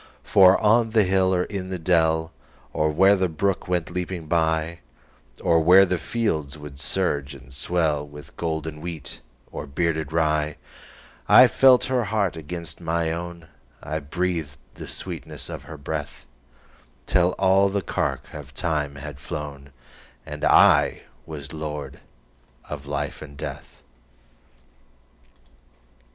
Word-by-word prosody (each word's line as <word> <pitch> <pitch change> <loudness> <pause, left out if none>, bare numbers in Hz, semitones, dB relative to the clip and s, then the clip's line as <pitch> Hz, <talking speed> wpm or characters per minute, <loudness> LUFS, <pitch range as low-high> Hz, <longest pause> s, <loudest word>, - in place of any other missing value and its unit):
For 95 -1 +6
on 115 +2 +4
the 110 - +7
hill 95 0 +2
or 90 -1 +2
in 95 -2 -5
the 95 - -3
dell, 80 -1 +2 0.4
Or 75 - +1
where 95 +6 +5
the 95 -2 0
brook 95 +5 -1
went 90 -3 -1
leaping 90 -2 -4
byOr 80 0 0 0.8
where 95 +4 +7
the 90 -1 -1
fields 80 -12 -2
would 75 -2 -10
surge 70 0 -1
and 65 0 -14
swellWith 75 -2 -2
golden 80 -2 -4
wheat 85 -3 -6 0.3
or - - -6
bearded 80 0 -1
rye,I 75 -6 +2
felt 130 -2 +5
her 125 -3 0
heart 100 -4 0
against 80 +1 -7
my 85 -1 0
own,I 80 -4 -7
breathed 80 -2 -3 0.2
the - - -9
sweetness - - -6
of - - -7
her 80 - -8
breath, 75 +1 -6 0.8
Till 90 +1 +2
all 95 +1 +4
the 100 0 -2
cark - - -3
of - - -10
time 75 -4 -1
had 70 -1 -8
flown, 70 -1 -7 0.6
And - - -8
I - - +5 0.2
was 75 -3 -8
lord 75 -3 -6 0.7
of 75 -1 -7
life 70 0 -3
and 70 -2 -10
death. - - -8
80 Hz, 125 wpm, -24 LUFS, 75-90 Hz, 0.8 s, the